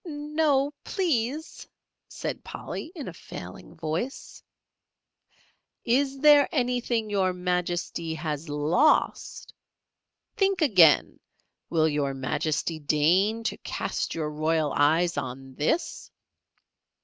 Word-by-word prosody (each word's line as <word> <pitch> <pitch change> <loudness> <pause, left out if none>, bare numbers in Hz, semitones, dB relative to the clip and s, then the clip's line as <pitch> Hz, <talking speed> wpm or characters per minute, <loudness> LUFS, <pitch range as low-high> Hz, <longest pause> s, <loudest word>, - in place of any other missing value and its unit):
"No, 295 -3 0
please," 310 - -2 0.4
said - - -5
Polly, 320 - -7
in 300 - -6
a - - -6
failing - - -10
voice. 165 - -4 1.4
"Is 270 +3 +1
there 295 -1 +7
anything 245 -2 0
Your 190 -2 +1
Majesty 175 -2 -2
has 155 -1 -4
lost? 155 - +1 0.8
Think 390 -3 +2
again! 180 - +5 0.5
Will 160 -2 +2
Your 145 -3 -1
Majesty 155 +4 -2
deign 180 +10 +2
to - - -2
cast - - -3
your 155 -2 -2
royal 155 0 0
eyes 160 +4 +2
on 130 +1 -5
this?" 330 - -2
180 Hz, 100 wpm, -26 LUFS, -, 1.4 s, there